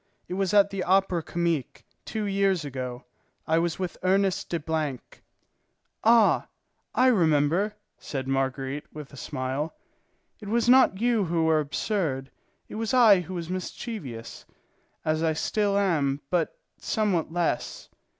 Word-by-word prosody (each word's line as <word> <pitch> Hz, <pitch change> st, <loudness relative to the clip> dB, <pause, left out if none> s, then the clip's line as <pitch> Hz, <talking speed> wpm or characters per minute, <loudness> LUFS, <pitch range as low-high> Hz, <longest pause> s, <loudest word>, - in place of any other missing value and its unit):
It -, -, -5 dB
was 190 Hz, -1 st, 0 dB
at 200 Hz, -1 st, +5 dB
the 195 Hz, -1 st, -3 dB
Opera 190 Hz, -2 st, +2 dB
Comique, 170 Hz, -5 st, -2 dB, 0.2 s
two 220 Hz, -1 st, -3 dB
years 195 Hz, -4 st, +1 dB
ago; 130 Hz, -2 st, -5 dB, 0.4 s
I 160 Hz, +1 st, +2 dB
was 170 Hz, -1 st, -1 dB
with 185 Hz, -2 st, -4 dB
Ernest 190 Hz, 0 st, +1 dB
de 170 Hz, -, -1 dB, 0.9 s
——." -, -, -49 dB
"Ah, 230 Hz, -1 st, +5 dB, 0.5 s
I 255 Hz, -, +4 dB
remember," 175 Hz, -, +3 dB, 0.2 s
said 135 Hz, -2 st, -5 dB
Marguerite, 135 Hz, +1 st, -2 dB
with 150 Hz, -2 st, -10 dB
a -, -, -9 dB
smile. 135 Hz, +3 st, -3 dB, 0.6 s
"It 210 Hz, -, -10 dB
was 235 Hz, +3 st, +1 dB
not 250 Hz, -6 st, +5 dB
you 230 Hz, -3 st, +2 dB
who 165 Hz, -1 st, 0 dB
were 160 Hz, -1 st, +4 dB
absurd; 145 Hz, -3 st, -2 dB, 0.4 s
it -, -, -9 dB
was 225 Hz, +3 st, 0 dB
I 220 Hz, -6 st, +7 dB
who 180 Hz, +1 st, -6 dB
was 170 Hz, 0 st, -5 dB
mischievous, 185 Hz, -, -6 dB, 0.6 s
as 155 Hz, 0 st, +1 dB
I 160 Hz, -1 st, +2 dB
still 200 Hz, +5 st, 0 dB
am, 150 Hz, -8 st, +1 dB
but 175 Hz, -3 st, 0 dB, 0.2 s
somewhat 195 Hz, -8 st, 0 dB
less. 170 Hz, -7 st, -2 dB
175 Hz, 140 wpm, -26 LUFS, 150-200 Hz, 0.9 s, I